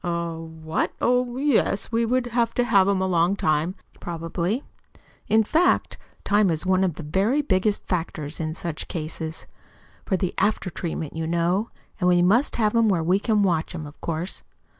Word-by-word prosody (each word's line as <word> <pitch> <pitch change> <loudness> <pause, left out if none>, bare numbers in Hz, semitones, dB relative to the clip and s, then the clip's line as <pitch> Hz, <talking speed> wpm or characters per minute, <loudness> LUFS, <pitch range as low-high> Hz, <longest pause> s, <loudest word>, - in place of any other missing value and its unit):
"Eh? 170 -1 -2
What? 160 -1 -3
Oh, 250 0 +1
yes, 260 -8 +1
we 230 0 +1
would 255 +1 +1
have 235 -1 +1
to 245 - +3
have 200 -5 +4
him 200 -1 +2
a - - +1
long 175 +1 +2
time, 155 +1 0 0.2
probably. 170 - -3 0.6
In 220 +1 +4
fact, 325 - +2 0.2
time 205 -1 +3
is 160 +1 -1
one 185 0 +3
of 180 -5 0
the 165 - -7
very 200 - +1
biggest 200 -3 +1
factors 165 -4 -3
in 160 -1 -3
such 170 -3 -5
cases 160 0 -5 0.6
for 190 - 0
the 185 -1 -2
after 205 -2 0
treatment, 160 -3 -4
you 160 0 -2
know. 175 +6 +1 0.3
And 180 -2 +3
we 175 -1 +4
must 230 +10 +3
have 215 -2 +1
him 230 -2 +4
where 175 -5 +1
we 180 +4 +2
can 210 -1 +2
watch 170 -3 0
him, 155 -3 -5
of 145 +1 -13
course." 170 +3 -3
185 Hz, 185 wpm, -24 LUFS, 165-215 Hz, 0.6 s, have